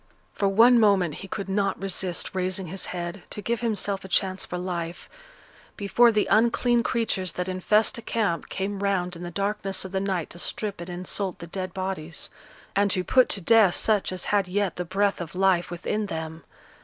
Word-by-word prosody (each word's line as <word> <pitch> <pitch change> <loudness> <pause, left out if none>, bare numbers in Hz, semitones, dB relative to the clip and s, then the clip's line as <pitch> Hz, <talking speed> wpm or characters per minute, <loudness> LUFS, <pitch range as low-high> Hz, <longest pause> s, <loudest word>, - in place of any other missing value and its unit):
For 200 - 0
one 230 +5 +6
moment 195 -7 +3
he 195 - -8
could 195 0 -5
not 195 0 0
resist 190 -2 -1
raising 185 0 -1
his 185 +3 -4
head, 175 +1 -5
to - - -4
give 230 +3 -2
himself 205 -4 0
a - - -8
chance 190 0 0
for 180 - -4
life; 175 -2 -4 0.7
before 235 +4 +4
the 215 -1 +2
unclean 235 +1 +3
creatures 220 -7 -1
that 180 0 -3
infest 210 +5 +2
a - - -8
camp 210 -7 -1
came 195 +1 -3
round 185 -3 0
in 170 - -9
the 175 - -5
darkness 195 +1 -1
of 190 - -7
the 190 - 0
night 190 -4 -2
to 170 - -8
strip 205 0 -3
and 170 - -7
insult 185 +1 -3
the 170 - -8
dead 185 +2 -5
bodies, 185 -4 -3 0.4
and 200 +1 +3
to 185 -1 +1
put 255 +6 +4
to 200 - -1
death 215 -1 +5
such 210 -4 +2
as 185 - -5
had 200 -2 +3
yet 195 0 -1
the 180 - -3
breath 195 +2 0
of 170 +1 -7
life 185 -2 +2
within 205 +5 -2
them. 160 -2 -6
190 Hz, 195 wpm, -26 LUFS, 180-205 Hz, 0.7 s, one